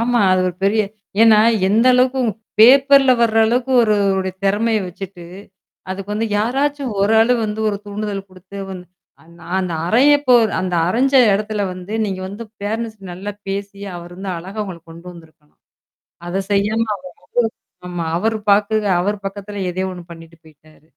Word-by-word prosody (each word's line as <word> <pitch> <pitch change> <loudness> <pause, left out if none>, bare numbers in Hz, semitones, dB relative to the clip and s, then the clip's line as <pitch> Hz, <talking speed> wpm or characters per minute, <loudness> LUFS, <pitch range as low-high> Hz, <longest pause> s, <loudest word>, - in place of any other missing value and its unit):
ஆமா. 240 +1 +1
அது 185 - +2
ஒரு 180 - -6
பெரிய 215 +2 +3 0.4
ஏன்னா 225 -2 +6 0.3
எந்த 225 +5 +3
அளவுக்கு 255 +1 +2
உ - - +2 0.3
பேப்பர்ல 270 +2 +7
வர 225 -1 +2
அளவுக்கு 245 +3 0
ஒரு, 215 -2 +2
ஒருவருடைய 190 -1 0
திறமைய 215 +3 +1
வச்சுட்டு, 180 0 -9 0.7
அதுக்கு 195 +1 -6
வந்து 220 +2 -1
யாராச்சும் 270 +3 -1
ஒரு 205 +3 +2
ஆளு 230 +2 +4
வந்து 215 0 -4
ஒரு 205 - -2
தூண்டுதல் 205 -1 -5
குடுத்து 185 +2 -12
வந் 185 -1 -7 0.4
அந் 170 +1 -19
நான் 175 +2 -4
அந்த 180 -3 -3
அறையபோர் 250 0 +4
அந்த 185 -1 -2
அறைஞ்ச 260 +8 +1 0.2
இடத்துல 210 +1 -1
வந்து 180 +3 -9
நீங்க 190 -3 -4
வந்து 205 +4 -8 0.2
பேரன்ட்ஸ் 220 +1 -3
நல்லா 190 +4 -6 0.2
பேசி 200 0 -5 0.2
அவர் 175 0 -10
வந்து 190 +1 -5
அழகா 190 +5 -6
உங்கள 185 -4 -8
கொண்டு 170 +2 -13
வந்திருக்கலாம். 160 -3 -19 0.7
அத 190 +3 -2
செய்யாம 215 +3 +1
அவர் 185 -1 -14 0.8
வந்து - - -7
ஆமா. 175 -2 -4
அவர் 220 +5 0 0.2
பாட்டுக்கு 210 +1 +2 0.2
அவர் 200 +2 -3
பக்கத்தில 200 0 -7
எதையோ 185 +1 -3
ஒண்ணு 175 -1 -10
பண்ணிட்டு 165 0 -15
போயிட்டாரு. 155 0 -22
200 Hz, 165 wpm, -19 LUFS, 185-225 Hz, 0.8 s, பேப்பர்ல